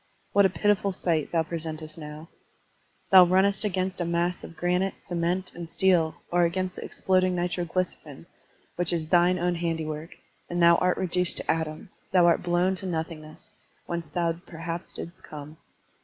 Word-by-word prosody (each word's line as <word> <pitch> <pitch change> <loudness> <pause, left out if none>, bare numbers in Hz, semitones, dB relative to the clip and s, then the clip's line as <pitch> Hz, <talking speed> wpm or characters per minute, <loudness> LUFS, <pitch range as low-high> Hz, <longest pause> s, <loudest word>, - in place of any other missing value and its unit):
What 200 -1 +6
a - - -6
pitiful 200 +1 +1
sight 165 -5 -1
thou 165 -1 +2
presentest 160 -1 -6
now! 155 +1 -9 0.8
Thou 190 -1 +10
runnest 190 +3 +3
against 185 -2 -1
a - - +2
mass 170 +1 -1
of 165 - -10
granite, 180 +3 0
cement, 175 +1 -2
and 170 -1 -8
steel, 175 -4 +3 0.2
or 175 0 +3
against 185 +2 -1
the - - -7
exploding 185 -1 +1
nitroglycerin, 175 -3 -3 0.5
which 175 0 +4
is 165 -2 -1
thine 175 +1 +4
own 175 0 0
handiwork, 160 -2 -3 0.3
and 175 - -2
thou 170 0 +6
art 180 0 +1
reduced 180 -1 0
to - - +2
atoms, 160 +3 -5
thou 180 -2 +5
art 170 - +4
blown 175 +2 +1
to 190 - -6
nothingness, 160 +3 -6 0.3
whence 170 -2 -4
thou 170 +2 0
perhaps 165 0 -7
didst 170 - -7
come. 150 +1 -10
175 Hz, 160 wpm, -27 LUFS, 165-185 Hz, 0.8 s, Thou